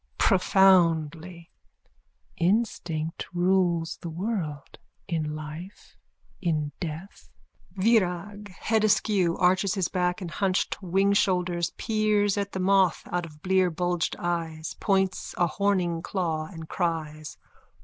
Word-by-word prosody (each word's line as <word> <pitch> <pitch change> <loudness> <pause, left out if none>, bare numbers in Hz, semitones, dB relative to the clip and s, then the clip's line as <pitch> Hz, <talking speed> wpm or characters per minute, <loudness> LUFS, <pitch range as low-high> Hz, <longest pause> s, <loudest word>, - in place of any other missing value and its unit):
(Profoundly.) 175 -3 +3 0.8
Instinct 170 -5 -1
rules 175 -2 +1
the 170 - -7
world. 165 -5 -4 0.3
In 155 -4 -2
life. 155 +5 -9 0.5
In 155 -5 -1
death. 170 +3 -7 0.4
VIRAG: 200 -1 +1 0.2
_(Head 220 -1 +2
askew, 200 -5 +2
arches 185 +2 +2
his 185 -3 0
back 180 -1 0
and 180 -3 -6
hunched 190 +2 0
wingshoulders, 185 -2 +1
peers 215 -2 +1
at 200 -1 -3
the 190 - -3
moth 190 -2 +3
out 175 -1 -1
of 150 -1 -17
blear 185 -1 +3
bulged 175 0 -1
eyes, 165 -2 -3
points 190 -2 0
a 175 - +3
horning 175 -1 0
claw 165 -4 -2
and 160 -3 -9
cries.) 155 -4 -3
180 Hz, 110 wpm, -26 LUFS, 165-195 Hz, 0.8 s, Profoundly